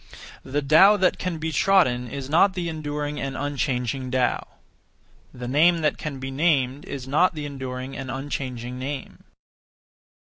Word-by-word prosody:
The 145 +2 -2
Tao 190 +9 +7
that 185 -2 +2
can 180 -3 -2
be 160 +1 -3
trodden 145 -8 +3
is 135 +2 -6
not 180 +6 +4
the 175 -2 -2
enduring 150 -2 -4
and 135 -1 -4
unchanging 130 -2 -2
Tao. 125 -1 0 0.8
The 125 -1 -7
name 165 +6 +4
that 150 - 0
can 150 -3 -5
be 135 0 -5
named 140 -2 +1
is 135 -2 -6
not 160 +6 +3
the 150 -1 -4
enduring 130 -2 -6
and 135 -1 -6
unchanging 130 -2 -4
name. 135 +1 -6
140 Hz, 150 wpm, -24 LUFS, 130-155 Hz, 0.8 s, Tao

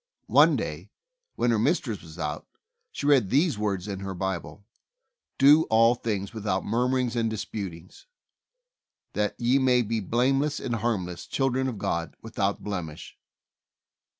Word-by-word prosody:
One - - +7
day, - - -4 0.5
when 120 - +1
her 115 - +2
mistress 120 - 0
was 80 0 -13
out, 75 -3 -4 0.4
she - - -5
read 135 -9 +4
these 145 - +2
words 100 -3 -2
in 100 -2 -4
her 95 -1 -5
Bible: 95 +2 -4 0.7
"Do 145 +4 +6
all 115 +1 +5
things 105 -5 -3
without 100 -4 -2
murmur 125 +4 +1
ings 125 -2 -1
and 115 -1 +1
disputings; 95 - -7 1.1
that 105 0 -1
ye 125 +3 +3
may 125 -2 +3
be 115 +1 -1
blame 125 +7 +1
less 145 +1 -1
and 120 -2 -2
harmless, 100 -6 -2
children 130 -1 0
of 125 -5 -4
God 85 -3 -2
without 100 -3 -2
blemish." 85 -7 -6
110 Hz, 150 wpm, -26 LUFS, 95-125 Hz, 1.1 s, One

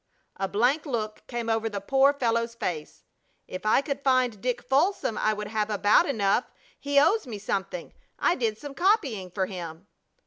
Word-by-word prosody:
A 195 - -1
blank 245 - +1
look 215 -5 -3
came 240 -2 -4
over 225 0 0
the 205 -2 -4
poor 270 +7 +4
fellow's 230 -4 -1
face. 160 -9 -5 0.4
"If 185 +3 -6
I 220 - +5
could 280 -1 -4
find 255 -6 +2
Dick 250 -1 -2
Folsom 275 - +1
I 215 - +1
would 210 0 -5
have 215 -1 -1
about 210 - +4
enough. 215 -3 +1 0.3
He 285 0 +3
owes 410 +4 +3
me 225 -4 -5
something. 190 -3 -4 0.2
I 345 - +2
did 225 -9 -1
some 285 +3 -8
copying 275 - +1
for 190 +1 -1
him." 175 -2 -7
230 Hz, 175 wpm, -27 LUFS, 205-270 Hz, 0.4 s, I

